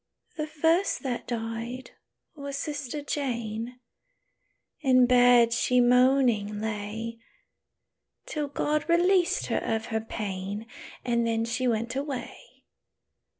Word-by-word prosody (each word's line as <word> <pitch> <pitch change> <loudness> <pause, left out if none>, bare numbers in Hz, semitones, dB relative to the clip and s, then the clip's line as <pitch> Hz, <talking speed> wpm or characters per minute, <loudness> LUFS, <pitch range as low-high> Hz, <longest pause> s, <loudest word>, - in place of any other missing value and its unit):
"The 305 -1 -3
first 325 +5 +1
that 250 -3 -3
died 230 +2 -4 0.4
was 280 -2 -6
sister 290 -1 -4
Jane; 240 -4 -3 1.0
In 255 -3 +5
bed 245 -1 +5
she 250 +1 +2
moaning 245 -4 +3
lay, 220 +2 -4 1.1
Till 300 -2 -3
God 300 +2 -1
released 350 +1 +3
her - - 0
of 225 0 -2
her 220 - +1
pain; 205 -1 -5 0.4
And 235 -1 +1
then 225 0 0
she 250 +2 -1
went 235 +1 -1
away. 275 -3 -3
245 Hz, 110 wpm, -27 LUFS, 225-280 Hz, 1.1 s, In